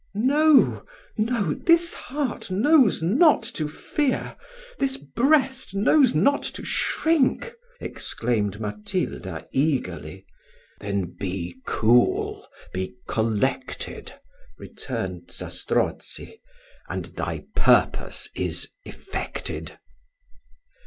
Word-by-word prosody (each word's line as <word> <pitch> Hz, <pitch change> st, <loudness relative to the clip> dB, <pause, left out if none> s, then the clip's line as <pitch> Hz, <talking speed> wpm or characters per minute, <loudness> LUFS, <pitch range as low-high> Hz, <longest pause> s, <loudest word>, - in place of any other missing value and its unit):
"No, 285 Hz, +6 st, +4 dB, 0.3 s
no 215 Hz, -7 st, 0 dB
this 335 Hz, 0 st, +3 dB
heart 270 Hz, -5 st, -4 dB
knows 235 Hz, -, +4 dB
not 260 Hz, -, +5 dB
to 155 Hz, -7 st, -2 dB
fear 265 Hz, -, -2 dB, 0.4 s
this 270 Hz, -1 st, +1 dB
breast 265 Hz, -, +1 dB
knows 250 Hz, +5 st, +4 dB
not 285 Hz, +1 st, +3 dB, 0.2 s
to -, -, -8 dB
shrink," 325 Hz, -, +1 dB, 0.3 s
exclaimed 105 Hz, -4 st, -2 dB
Matilda 105 Hz, -, -4 dB
eagerly. 95 Hz, -, -1 dB, 0.5 s
"Then 100 Hz, -3 st, -3 dB
be 90 Hz, -2 st, -4 dB
cool 120 Hz, +2 st, +2 dB, 0.3 s
be 95 Hz, +5 st, -3 dB
collected," 115 Hz, +4 st, -2 dB, 0.5 s
returned -, -, -6 dB
Zastrozzi, 450 Hz, -, -3 dB, 0.5 s
"and -, -, -3 dB
thy -, -, -5 dB
purpose -, -, +2 dB
is -, -, -2 dB
effected." -, -, -5 dB
190 Hz, 85 wpm, -24 LUFS, -, 0.5 s, not